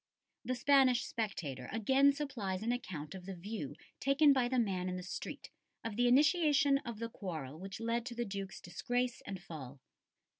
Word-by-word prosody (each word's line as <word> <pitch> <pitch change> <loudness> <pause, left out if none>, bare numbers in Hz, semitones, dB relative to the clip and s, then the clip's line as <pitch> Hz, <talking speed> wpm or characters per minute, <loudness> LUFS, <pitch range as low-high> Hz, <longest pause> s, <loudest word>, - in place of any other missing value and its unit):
The 255 - -1
Spanish 255 -1 +5
spectator 155 - -3
again 265 +6 +4
supplies 230 -10 -3
an 235 - +1
account 165 -11 -4
of 185 -1 -9
the 195 - -4
view 175 -6 -5 0.2
taken 280 +2 +5
by 255 -3 +2
the 255 +1 0
man 190 -6 +1
in 185 - -3
the 180 - -6
street 190 - -6 0.3
of 225 -2 -4
the 245 +2 +3
initiation 285 +1 +5
of 235 -5 -6
the 230 +1 -3
quarrel 160 - -6
which 195 +2 -7
led 230 +1 -1
to 240 - -5
the 240 0 -1
Duke's 195 -2 -5
disgrace 245 +6 -2
and 195 -2 -4
fall. 145 -6 -9
225 Hz, 180 wpm, -34 LUFS, 185-255 Hz, 0.3 s, Spanish